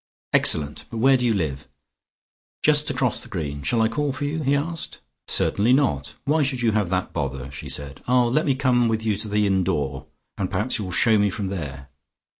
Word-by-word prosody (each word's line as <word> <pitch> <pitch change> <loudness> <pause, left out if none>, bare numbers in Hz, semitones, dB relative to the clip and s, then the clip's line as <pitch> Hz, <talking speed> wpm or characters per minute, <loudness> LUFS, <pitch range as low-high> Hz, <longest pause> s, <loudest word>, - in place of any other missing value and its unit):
"Excellent; 75 -1 +3
but 115 - -6
where 135 +4 +5
do 125 - 0
you 115 - +3
live?" 75 -8 -3 1.0
"Just - - +4
across - - 0
the - - -12
green. 70 -3 -4
Shall 115 - +1
I - - +4
call 145 +5 -1
for 130 +2 -4
you?" 155 +3 -2
he 140 0 +2
asked. 165 +3 -3 0.3
"Certainly 110 +5 +2
not. 75 - +1
Why 155 +3 +2
should 130 -3 0
you 115 - +3
have 105 -4 0
that 90 0 -2
bother?" 70 -3 -4
she 70 - -7
said. 70 -1 -5
"Ah, 125 0 +4
let 130 +7 +1
me 135 - +2
come 125 -3 +2
with 110 0 -1
you 110 -2 +1
to 110 +1 -5
the 105 0 +1
inn 95 -2 +2
door, 70 -7 -2 0.3
and - - -1
perhaps 115 +2 -1
you 105 - -3
will 90 - -6
shew 110 +4 +3
me 100 0 +3
from 95 0 -4
there." 70 -8 -6
105 Hz, 220 wpm, -23 LUFS, -, 1.0 s, where